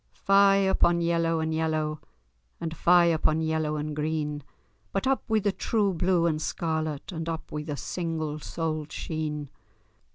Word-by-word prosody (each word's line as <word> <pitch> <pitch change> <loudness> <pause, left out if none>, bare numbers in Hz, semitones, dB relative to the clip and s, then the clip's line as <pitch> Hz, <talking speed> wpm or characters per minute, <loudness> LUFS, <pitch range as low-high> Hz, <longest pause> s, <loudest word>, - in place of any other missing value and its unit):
Fye 195 0 +5
upon 190 -3 +3
yellow 165 -1 +1
and 160 0 -1
yellow, 155 -1 -1 0.6
And 165 -1 -4
fye 175 +2 +5
upon 160 -1 +2
yellow 160 -1 0
and 150 0 -3
green, 150 -1 -2 0.5
But 195 - -1
up 270 0 +2
wi' 220 - +3
the 205 - +1
true 205 -1 0
blue 175 0 +2
and 155 -2 0
scarlet, 160 -2 -2
And 165 -1 -4
up 165 -1 -5
wi' 150 - -3
the 150 -1 -5
single 160 -3 -3
soled 155 -1 -3
sheen. 150 -3 -4
160 Hz, 155 wpm, -27 LUFS, 155-170 Hz, 0.6 s, Fye